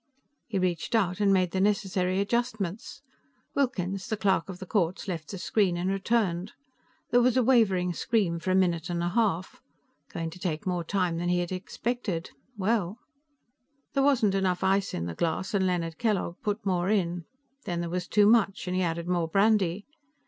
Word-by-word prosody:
He 215 - -2
reached 185 +4 -1
out 185 -4 +1
and 205 -1 +3
made 185 -2 +3
the 190 - 0
necessary 190 -2 +1
adjustments. 220 -1 -2 0.5
Wilkins, 195 -8 -1
the 220 - -2
Clerk 195 -3 +1
of 185 - -6
the 190 - -8
Courts, 185 +1 -1
left 165 -5 -4
the 195 - -5
screen, 185 -1 +1
and 180 +2 -1
returned. 195 -2 0 0.6
There 245 +1 +5
was 250 +1 +3
a 255 - +4
wavering 195 -8 +3
scream 195 -6 0
for 185 - -4
a 185 - +3
minute 175 -2 +1
and 170 -1 -1
a 175 - 0
half. 190 -3 0 0.5
Going 165 -1 -4
to 180 - -11
take 160 -4 -3
more 180 -2 -1
time 180 -1 0
than 175 +1 -1
he 180 - +2
had 175 0 -2
expected. 185 -1 -3 0.3
Well.... 205 -1 0 1.0
There 275 - +2
wasn't 260 -8 +3
enough 190 -2 0
ice 195 +1 +1
in 85 - -3
the 85 - -4
glass, 170 - -2
and 190 -2 +2
Leonard 165 -3 -2
Kellogg 200 -6 0
put 210 -2 -2
more 180 -1 +1
in. 175 -5 0 0.4
Then 175 -1 -2
there 170 - -3
was 180 0 -2
too 210 -1 +4
much, 210 -3 +3
and 180 - -1
he 185 - +1
added 170 -1 -2
more 175 -2 +1
brandy. 200 0 +2
185 Hz, 185 wpm, -28 LUFS, 175-210 Hz, 1.0 s, There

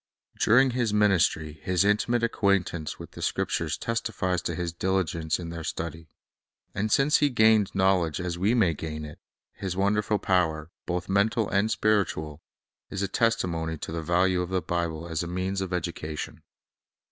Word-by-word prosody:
During 130 +4 +5
His 120 -3 0
ministry 85 -7 +2
His 90 +1 +1
intimate 115 +3 +2
acquaintance 100 -8 0
with - - -10
the - - -10
Scriptures 80 -2 -1
testifies 110 -6 -1
to 85 - -3
His 85 -1 -3
diligence 85 -3 0
in 85 -2 -6
their 85 -1 -6
study. 80 0 -5 0.7
And 105 +2 -1
since 140 +5 +4
He 145 - +3
gained 110 -4 +4
knowledge 95 -4 +2
as 90 -1 -2
we 100 +7 +1
may 95 -8 +3
gain 75 0 -5
it, 75 - -10 0.3
His 95 -2 -5
wonderful 105 +2 +1
power, 80 -5 0 0.2
both 90 0 -2
mental 100 +3 +2
and 100 +2 +2
spiritual, 85 -9 0 0.5
is 100 0 -3
a - - +1
testimony 90 -8 0
to 75 - -6
the 80 0 -3
value 90 +2 +2
of 90 - -3
the 95 0 +1
Bible 85 -1 -2
as 80 -2 -2
a 85 - -3
means 95 +2 -2
of 95 -1 -4
education. 85 -3 -4
90 Hz, 165 wpm, -27 LUFS, 85-105 Hz, 0.7 s, During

